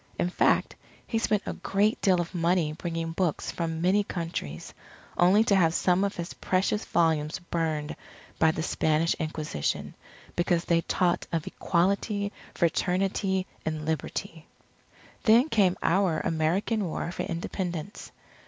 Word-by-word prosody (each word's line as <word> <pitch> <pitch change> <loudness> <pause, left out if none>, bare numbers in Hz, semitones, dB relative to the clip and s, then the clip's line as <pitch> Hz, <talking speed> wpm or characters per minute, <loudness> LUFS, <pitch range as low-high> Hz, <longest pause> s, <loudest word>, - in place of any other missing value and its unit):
In 175 - 0
fact, - - +2 0.3
he 225 - -1
spent 210 -2 +1
a - - -3
great 205 +2 0
deal 185 -3 +4
of 175 +1 -3
money 170 -2 +1
bringing 165 0 -3
books 170 -2 -1
from 165 -1 -3
many 190 +4 +3
countries; 165 - -5 0.4
only 190 +5 +5
to 215 -3 +3
have 170 -3 +3
some 180 +1 +3
of 200 0 -1
his 170 -2 -5
precious 190 +3 0
volumes 160 -2 +1
burned 160 -4 -2 0.4
by 160 - +5
the 160 0 -1
Spanish 160 0 +1
Inquisition, 155 - -2 0.4
because 175 0 +1
they 170 -1 +3
taught 175 0 0
of 165 -2 -1
Equality, 200 +3 0 0.2
Fraternity, 190 +2 +1 0.2
and 155 -1 -3
Liberty. 160 +2 -4 0.7
Then 240 +5 +5
came 195 -7 +3
our 185 -1 +2
American 185 +7 0
War 170 0 -3
for - - -4
Independence. 175 +1 -4
175 Hz, 135 wpm, -27 LUFS, 160-195 Hz, 0.7 s, only